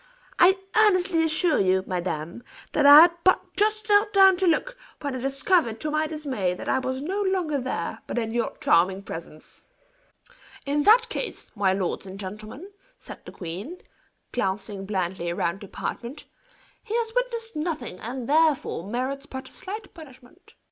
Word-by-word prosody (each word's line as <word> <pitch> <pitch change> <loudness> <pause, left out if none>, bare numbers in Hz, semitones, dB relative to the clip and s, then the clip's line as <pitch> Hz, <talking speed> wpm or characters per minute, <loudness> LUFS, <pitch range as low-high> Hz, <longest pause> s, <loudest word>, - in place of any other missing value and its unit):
I 375 +2 +6 0.2
earnestly 370 -5 +3
assure 320 +1 +1
you, 190 -1 +2
madame, 175 +1 -4 0.3
that 290 -2 +3
I 290 +2 +11
had 345 +1 +7
but 370 - +2
just 430 +1 +1
knelt 415 0 +4
down 385 -1 +7
to 375 0 +1
look, 425 +10 +1 0.2
when 285 -2 -4
I - - -4
discovered 275 - +1
to 305 - -2
my 310 +1 0
dismay, 270 - -2
that - - -8
I 265 - +2
was 260 +1 -3
no 385 +6 -2
longer 365 -7 0
there, 250 -10 -4
but - - -4
in 225 -2 -1
your 235 0 -2
charming 185 +3 +2
presence." 165 -4 -10 1.0
"In 290 +1 0
that 450 +4 +6
case, - - -5
my 200 -2 +2
lords 190 0 -3
and 190 +1 -9
gentlemen," 215 - -8 0.3
said - - -11
the - - -9
queen, 195 - -7 0.5
glancing 195 -2 -3
blandly 185 -3 -2
round 170 +2 -2
the 200 - -9
apartment, 245 +8 -6 0.6
"he 450 0 -4
has 460 -1 -1
witnessed 470 -2 -2
nothing, 300 - -4
and, 240 +1 -6
therefore, 305 - +2
merits 260 +4 -3
but 265 0 -8
slight 420 +3 -7
punishment." 315 +1 -16
275 Hz, 160 wpm, -25 LUFS, -, 1.0 s, I